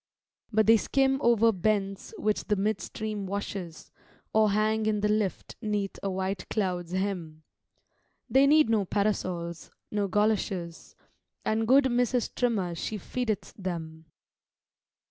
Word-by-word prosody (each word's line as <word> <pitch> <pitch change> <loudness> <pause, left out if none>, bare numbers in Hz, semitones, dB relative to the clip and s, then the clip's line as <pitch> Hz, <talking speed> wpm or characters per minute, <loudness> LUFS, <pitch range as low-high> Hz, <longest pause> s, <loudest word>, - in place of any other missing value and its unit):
But 220 0 +3
they 225 +2 +7
skim 270 +4 +1
over 230 -1 +4
bents 195 - -1
which 215 - 0
the 210 - +1
midstream 210 0 -2
washes, 195 -4 -5 0.4
Or 215 -1 +4
hang 215 +1 +1
in 210 -1 +1
the 210 - +2
lift 210 -2 -1
'neath 210 -3 -2
a 195 - -2
white 190 0 -3
cloud's 180 -4 -2
hem; 180 -5 -3 0.8
They 270 +1 +5
need 305 +1 +6
no 220 -3 +2
parasols, 180 -4 -2 0.2
no 205 -1 0
goloshes; 195 -4 -1 0.5
And 220 +1 +1
good 270 +3 +6
Mrs. 245 -1 +1
Trimmer 210 -8 0
she 210 +5 -4
feedeth 215 0 -3
them. 165 -4 -6
210 Hz, 125 wpm, -28 LUFS, 190-220 Hz, 0.8 s, they